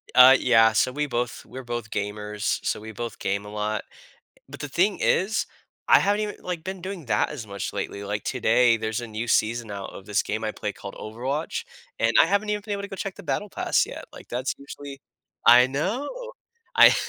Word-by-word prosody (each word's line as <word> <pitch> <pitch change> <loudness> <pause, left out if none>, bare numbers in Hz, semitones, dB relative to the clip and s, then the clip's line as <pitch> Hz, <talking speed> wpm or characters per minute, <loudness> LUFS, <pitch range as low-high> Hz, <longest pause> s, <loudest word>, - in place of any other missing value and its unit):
Uh, 130 +1 +10
yeah, 115 -2 +5
so, 125 +4 +2
we 150 +1 0
both 120 -2 -3
we're 130 - -8
both 120 -2 -4
gamers, 105 0 -2
so, - - 0
we 110 +1 -9
both 115 0 -6
game 100 +1 -1
a 105 - -8
lot. 105 0 -2 0.5
Eh, - - -26
but - - -9
the 145 - -4
thing 185 +7 +2
is, 205 +4 +2 0.4
I - - +8
haven't 205 +1 +2
even 210 -1 -3
like, 175 -3 -4
been 190 +1 -6
doing 185 -5 -6
that - - +1
as 125 -8 -7
much 100 -1 -4
lately. 100 - -4
Like, 105 0 -3
today, 120 -1 +4
there's 110 0 -2
a 120 - -6
new 110 +1 -4
season 115 0 +1
out 100 -1 -6
of 95 - -10
this 105 -1 +1
game 110 +1 -3
I 110 - -1
play 105 -1 -4
called 100 - -9
Overwatch, 130 +8 -3 0.4
and 115 0 +3
I - - +5
haven't 200 +4 +1
even 210 0 0
been 210 - -2
able 200 - -3
to 200 - -7
go 195 - -7
check 195 -1 -4
the 200 - -11
battle 190 +6 -2
pass - - +1
yet, - - -8
like, - - -13
that's 125 +2 -2
usually 140 0 -9 0.5
I 125 +2 +8
know. 195 - -2 0.7
I - - +9
120 Hz, 220 wpm, -25 LUFS, 110-165 Hz, 0.7 s, Uh